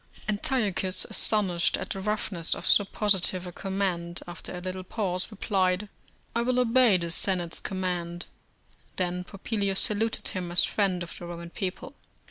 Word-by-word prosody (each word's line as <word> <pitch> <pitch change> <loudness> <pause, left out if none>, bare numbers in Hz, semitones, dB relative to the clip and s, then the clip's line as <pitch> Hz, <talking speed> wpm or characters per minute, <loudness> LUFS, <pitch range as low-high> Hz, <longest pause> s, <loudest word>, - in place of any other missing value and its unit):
Antiochus, 205 -5 +2
astonished 190 -6 +3
at - - -5
the 195 - -2
roughness 200 -4 -1
of - - -7
so 205 - +6
positive 190 -3 +1
a 180 - -6
command, 180 -2 -2
after 175 +1 -7
a 180 - -5
little 185 +1 -4
pause, 185 -1 -1
replied, 195 -2 0 0.5
"I 235 - +3
will 250 +1 +1
obey 245 -4 +5
the 170 -1 -3
Senate's 175 -1 0
command." 175 -2 -3 0.7
Then 180 0 -1
Popilius 200 0 -2
saluted 220 +2 0
him 180 -4 -4
as 175 - +5
friend 190 -4 +1
of 170 - -8
the 175 - -7
Roman 170 0 -7
people. 185 0 -4
185 Hz, 150 wpm, -28 LUFS, 175-205 Hz, 0.7 s, so